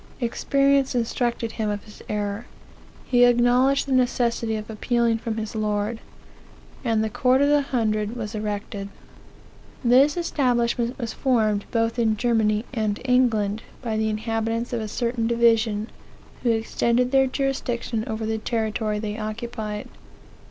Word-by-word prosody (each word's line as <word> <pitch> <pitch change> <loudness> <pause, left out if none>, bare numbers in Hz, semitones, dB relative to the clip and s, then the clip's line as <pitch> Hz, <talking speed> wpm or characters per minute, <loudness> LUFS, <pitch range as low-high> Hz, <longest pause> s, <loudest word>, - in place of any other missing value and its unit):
Experience 275 +2 +2
instructed 235 -1 -1
him 220 -2 -2
of 205 -1 -3
his 210 - -14
error", 205 +2 -3 0.6
he 245 -1 +4
acknowledged 245 +3 +4
the 275 - -6
necessity 240 -3 +1
of 215 0 -5
appealing 230 +1 0
from 225 -1 -4
his 220 -1 -4
lord; 210 +1 -1 0.8
and 225 -3 +1
the - - 0
court 255 +4 +3
of 285 +1 +3
the 290 0 +4
Hundred 220 -5 -1
was 220 -3 -5
erected. 205 -1 -4 0.9
"This 265 +6 +5
establishment 245 -6 0
was 235 -4 -4
formed 215 -6 +1
both 230 +1 0
in 220 -2 +2
Germany 220 -1 +1
and 215 -3 -1
England, 225 -5 +2 0.2
by 225 -3 -2
the 220 0 +1
inhabitants 225 +2 -2
of 235 - -1
a 215 - -4
certain 235 +1 -1
division, 225 -2 +2 0.5
who 245 - +1
extened 235 +2 +1
their 270 -1 +4
jurisdiction 255 -4 -2
over 220 0 -3
the 220 0 -1
territory 220 -1 -1
they 210 0 -4
occupied. 215 -1 -5
230 Hz, 140 wpm, -24 LUFS, 215-245 Hz, 0.9 s, This